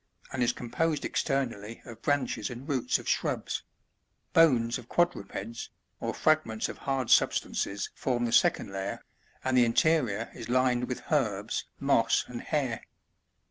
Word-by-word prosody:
and 130 Hz, -, -2 dB
is 120 Hz, 0 st, +4 dB
composed 150 Hz, +6 st, -1 dB
externally 120 Hz, -6 st, -1 dB
of 115 Hz, -1 st, -10 dB
branches 145 Hz, -1 st, 0 dB
and 125 Hz, +3 st, -8 dB
roots 135 Hz, -5 st, +1 dB
of -, -, -10 dB
shrubs; -, -, -1 dB, 0.7 s
bones 125 Hz, -8 st, +4 dB
of 120 Hz, -, -14 dB
quadrupeds, 115 Hz, -, -1 dB, 0.3 s
or -, -, -2 dB
fragments 155 Hz, -9 st, +1 dB
of -, -, -8 dB
hard 135 Hz, -3 st, -1 dB
substances 100 Hz, 0 st, +2 dB
form 120 Hz, -2 st, -1 dB
the 115 Hz, -, -1 dB
second 100 Hz, -, +3 dB
layer, 95 Hz, +1 st, -4 dB, 0.4 s
and 130 Hz, 0 st, +1 dB
the 125 Hz, -, +6 dB
interior 115 Hz, -3 st, +2 dB
is 115 Hz, -2 st, -8 dB
lined 125 Hz, -1 st, +2 dB
with 125 Hz, 0 st, -5 dB
herbs, 110 Hz, -8 st, 0 dB
moss, 135 Hz, -5 st, +3 dB
and 120 Hz, -1 st, -6 dB
hair. 135 Hz, -6 st, -1 dB
125 Hz, 140 wpm, -29 LUFS, 115-140 Hz, 0.7 s, the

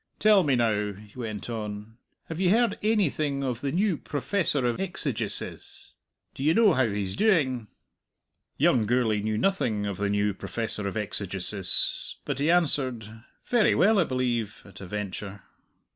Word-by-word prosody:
Tell 210 Hz, -2 st, +5 dB
me 145 Hz, -6 st, +2 dB
now," 105 Hz, -4 st, 0 dB
he 105 Hz, +1 st, -15 dB
went 110 Hz, -5 st, -5 dB
on, 110 Hz, 0 st, -6 dB, 0.3 s
"have 160 Hz, 0 st, -6 dB
ye 185 Hz, -, +3 dB
heard 225 Hz, +1 st, +3 dB
ainything 155 Hz, -10 st, 0 dB
of 125 Hz, -3 st, -3 dB
the 140 Hz, -, -2 dB
new 185 Hz, +1 st, +1 dB
Professor 145 Hz, -, -1 dB
of 120 Hz, -1 st, 0 dB
Exegesis? 140 Hz, -, -2 dB, 0.4 s
D'ye 150 Hz, +4 st, +1 dB
know 220 Hz, -3 st, +5 dB
how 130 Hz, -4 st, +2 dB
he's 100 Hz, -2 st, -2 dB
doing?" 140 Hz, -, +1 dB, 0.9 s
Young 110 Hz, -4 st, +3 dB
Gourlay 115 Hz, -3 st, +1 dB
knew 110 Hz, 0 st, -1 dB
nothing 115 Hz, -, 0 dB
of 100 Hz, -3 st, -3 dB
the 100 Hz, +1 st, -1 dB
new 105 Hz, 0 st, +1 dB
Professor 105 Hz, +1 st, -4 dB
of 100 Hz, -, -4 dB
Exegesis, 100 Hz, -2 st, -1 dB
but -, -, -3 dB
he 145 Hz, +3 st, +1 dB
answered, 130 Hz, -10 st, +2 dB, 0.2 s
"Very 240 Hz, -3 st, +3 dB
well, 210 Hz, +2 st, +4 dB
I -, -, +5 dB
believe," 120 Hz, -5 st, -2 dB
at 100 Hz, -2 st, -13 dB
a 95 Hz, -, -8 dB
venture. 100 Hz, 0 st, -6 dB
120 Hz, 155 wpm, -26 LUFS, 105-155 Hz, 0.9 s, Tell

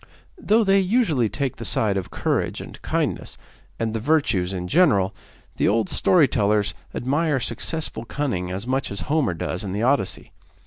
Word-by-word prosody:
Though 225 Hz, -6 st, +3 dB
they 195 Hz, -1 st, +4 dB
usually 185 Hz, -, +2 dB
take 135 Hz, 0 st, -3 dB
the -, -, -6 dB
side 105 Hz, 0 st, +1 dB
of 95 Hz, -2 st, -3 dB
courage -, -, -1 dB
and -, -, -10 dB
kindness, -, -, -2 dB, 0.4 s
and 115 Hz, -1 st, -1 dB
the 115 Hz, -, -1 dB
virtues 115 Hz, -, +1 dB
in 90 Hz, -2 st, -4 dB
general, 105 Hz, -, +3 dB, 0.4 s
the -, -, +2 dB
old 105 Hz, -1 st, +2 dB
story 170 Hz, -6 st, +4 dB
tellers 105 Hz, -3 st, +1 dB, 0.2 s
admire 145 Hz, +2 st, +1 dB
successful 150 Hz, -1 st, -3 dB
cunning 115 Hz, -10 st, -2 dB
as 95 Hz, +4 st, -4 dB
much 130 Hz, +2 st, -1 dB
as 100 Hz, -, -5 dB
Homer 145 Hz, -, 0 dB
does 90 Hz, +3 st, -3 dB
in 95 Hz, -2 st, -4 dB
the 105 Hz, +3 st, -1 dB
Odyssey. 120 Hz, -8 st, 0 dB
115 Hz, 170 wpm, -23 LUFS, 100-150 Hz, 0.4 s, they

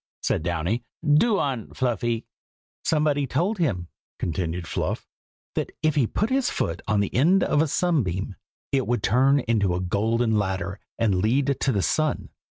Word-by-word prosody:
said -, -, +1 dB
Downy. 85 Hz, +7 st, -1 dB, 0.2 s
"Do 195 Hz, +9 st, +4 dB
on, 130 Hz, -6 st, -2 dB
Fluffy!" 120 Hz, -2 st, -1 dB, 0.6 s
"Somebody 150 Hz, -3 st, +1 dB
told 180 Hz, -, 0 dB
him," 100 Hz, -, 0 dB, 0.3 s
continued 85 Hz, 0 st, -2 dB
Fluff, -, -, -3 dB, 0.5 s
"that -, -, -2 dB
if 155 Hz, -1 st, +3 dB
he 140 Hz, -6 st, +2 dB
put 215 Hz, -, -1 dB
his 265 Hz, -1 st, +2 dB
foot 85 Hz, 0 st, -2 dB
on 105 Hz, -1 st, +2 dB
the 100 Hz, -, -2 dB
end 175 Hz, +10 st, +4 dB
of 145 Hz, -, +2 dB
a 160 Hz, -, +2 dB
sunbeam, 110 Hz, -, 0 dB, 0.4 s
it 135 Hz, -2 st, +1 dB
would 120 Hz, -3 st, 0 dB
turn 135 Hz, +7 st, +4 dB
into 105 Hz, -6 st, +1 dB
a -, -, -1 dB
golden 110 Hz, +4 st, +1 dB
ladder 95 Hz, 0 st, -2 dB, 0.2 s
and 100 Hz, -5 st, +2 dB
lead 135 Hz, +6 st, +2 dB
to 135 Hz, -, +2 dB
the 100 Hz, -5 st, 0 dB
sun. 155 Hz, -1 st, 0 dB
120 Hz, 160 wpm, -25 LUFS, 95-145 Hz, 0.6 s, Do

